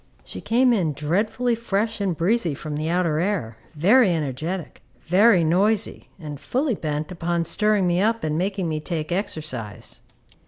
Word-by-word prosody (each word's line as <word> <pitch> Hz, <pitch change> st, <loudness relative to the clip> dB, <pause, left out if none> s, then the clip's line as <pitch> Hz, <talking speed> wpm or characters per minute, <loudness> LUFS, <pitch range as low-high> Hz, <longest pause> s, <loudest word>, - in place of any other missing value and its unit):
She -, -, -8 dB
came 245 Hz, +2 st, +3 dB
in 170 Hz, -9 st, +1 dB
dreadfully 205 Hz, -, 0 dB
fresh 220 Hz, -1 st, -1 dB
and 185 Hz, -5 st, -1 dB
breezy 175 Hz, -3 st, +1 dB
from 150 Hz, +2 st, -6 dB
the 155 Hz, +2 st, -2 dB
outer 170 Hz, -3 st, +1 dB
air, 170 Hz, -, -2 dB, 0.2 s
very 205 Hz, -, +5 dB
energetic, 155 Hz, +4 st, -4 dB, 0.2 s
very 190 Hz, +1 st, +4 dB
noisy, 195 Hz, +6 st, +1 dB
and 150 Hz, -5 st, -8 dB
fully 265 Hz, -, -1 dB
bent 155 Hz, -3 st, -3 dB
upon 170 Hz, -1 st, -1 dB
stirring 210 Hz, +4 st, +1 dB
me 175 Hz, +1 st, +2 dB
up 225 Hz, +2 st, +1 dB
and 155 Hz, -1 st, -1 dB
making 190 Hz, +1 st, -1 dB
me 155 Hz, -1 st, -2 dB
take 155 Hz, 0 st, -4 dB
exercise. 155 Hz, -, -4 dB
175 Hz, 155 wpm, -23 LUFS, 155-210 Hz, 0.2 s, very